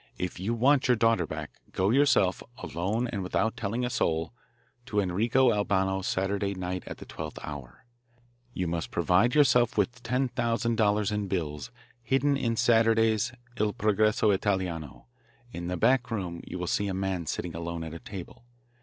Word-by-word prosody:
If 90 -1 -4
you 110 +6 -1
want 130 +4 +3
your 125 - +5
daughter 115 -7 +2
back, - - -6 0.2
go 95 +3 +2
yourself, 125 -9 +3 0.2
alone 100 +9 -2
and 100 - -3
without 110 +5 0
telling 115 +2 -2
a - - -1
soul, 80 -8 0 0.5
to 105 - 0
Enrico 115 +7 +3
Albano's 95 -2 0
Saturday 100 +1 -1
night 90 0 -4
at - - -6
the - - -10
twelfth 75 -1 -7
hour. 70 - -8 0.7
You 95 - -2
must 85 -1 -2
provide 90 - +2
yourself 125 -6 +4
with 120 +5 0
$10,000 115 -4 +1
in 105 -1 -1
bills 75 -6 -3 0.3
hidden 135 +4 +2
in 115 -4 0
Saturday's 115 -1 +3 0.3
Il 105 -1 +1
Progresso 110 -1 +2
Italiano. 95 - -2 0.5
In 85 0 -5
the 90 0 -2
back 125 +6 +3
room 90 -7 -3
you - - -5
will 90 - -3
see 100 +3 0
a 95 - -2
man 95 -3 -2
sitting 85 +2 -3
alone 85 0 -4
at 80 -1 -7
a 85 - -7
table. 95 +5 -9
100 Hz, 165 wpm, -28 LUFS, 90-115 Hz, 0.7 s, your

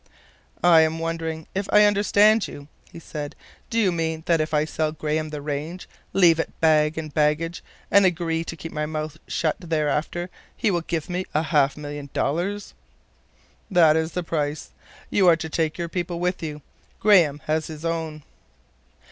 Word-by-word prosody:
"I 170 -2 +7
am 160 0 +1
wondering 165 -1 -3
if 195 +1 -3
I 210 - +7
understand 205 +1 +4
you," 140 0 -10 0.2
he - - -11
said. 150 -3 -7 0.3
"Do 230 - -2
you 205 -5 +3
mean 160 -1 -2
that 165 -2 +3
if 155 - -2
I 150 0 +2
sell 155 0 -1
Graham 155 0 -2
the 150 -1 -6
range, 150 +5 -4 0.2
leave 170 -4 +5
it - - -4
bag 155 -1 +3
and 155 -2 -5
baggage, 155 +3 0 0.3
and 200 - +6
agree 165 -3 +1
to 165 - -6
keep 165 0 -8
my 150 0 -2
mouth 155 0 -5
shut 155 -2 -1
thereafter, 160 +1 -1 0.3
he 215 - +1
will 175 -2 0
give 165 -2 -3
me 180 +1 -3
half 150 -3 +2
a - - -8
million 145 -1 -7
dollars?" 180 +8 -2 1.0
"That 165 -5 +5
is 160 0 -1
the 180 - -2
price. 150 -2 -3 0.4
You 195 -3 +4
are 170 - +7
to 160 0 -5
take 160 0 -1
your 170 -1 -3
people 175 0 -3
with 180 +1 -1
you. 150 -3 -6 0.4
Graham 175 -9 +5
has 155 0 0
his 155 0 -8
own." 160 -2 -3
160 Hz, 175 wpm, -24 LUFS, 155-175 Hz, 1.0 s, I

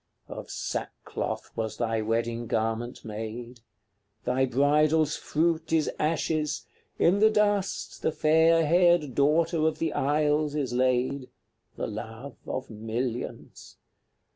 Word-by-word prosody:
CLXX. - - -8
Of - - -10
sackcloth - - -4
was 110 -1 -3
thy 115 -2 0
wedding 115 +1 -1
garment 115 +2 -2
made: 115 +3 -6 0.7
Thy 130 +2 +2
bridal's 150 +4 +3
fruit 160 0 0
is 160 -2 +2
ashes; 155 -1 0 0.3
in 185 +4 +4
the 220 +1 +6
dust 205 -2 0
The - - +1
fair 160 +1 +4
haired 170 -3 +4
Daughter 155 +4 +2
of 160 - -1
the 165 - -1
Isles 150 +1 +1
is 135 -5 -1
laid, 130 +1 +1 0.5
The - - -3
love 115 +4 -7
of 130 - -4
millions! 115 +3 -5
140 Hz, 120 wpm, -27 LUFS, 120-160 Hz, 0.7 s, the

